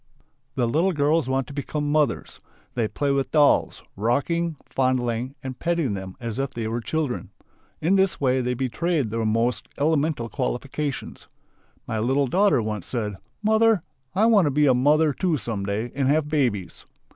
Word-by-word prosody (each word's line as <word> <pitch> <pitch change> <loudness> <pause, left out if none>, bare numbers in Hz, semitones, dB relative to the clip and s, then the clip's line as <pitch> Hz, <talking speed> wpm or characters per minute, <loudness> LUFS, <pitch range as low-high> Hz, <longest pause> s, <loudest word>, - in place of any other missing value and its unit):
The 125 -3 +1
little 165 +10 +2
girls 150 -1 +2
want 135 0 +1
to - - -10
become 145 +1 -2
"mothers." 150 -5 0 0.3
They 115 -3 0
play 140 +5 -1
with 135 -1 0
dolls, 150 -2 +3
rocking, 155 - 0
fondling, 130 -1 -1
and 130 -1 -6
petting 170 -9 0
them 95 -1 -6
as 115 0 -4
if 135 -1 -2
they 115 -2 -2
were 115 +2 -2
children. 150 -1 -2 0.5
In 185 +5 +3
this 190 -3 +2
way 130 -1 +2
they 125 0 -1
betray 135 +6 0
their 115 0 -2
most 115 +3 0
elemental 150 -4 +1
qualification. 135 +3 -3 0.7
My 110 - -2
little 135 +5 +2
daughter 185 - +3
once 105 -4 -4
said: 110 -4 -2 0.3
"Mother! 220 -3 +4 0.3
I 210 +4 +4
want 215 -6 +5
to - - +3
be 150 +2 +3
a 135 - +5
mother, 150 +4 +3
too, 175 0 0
some 105 -5 -4
day 110 +4 -2
and 135 -1 0
have 150 +1 +2
babies." 120 - -1
135 Hz, 170 wpm, -24 LUFS, 120-155 Hz, 0.7 s, want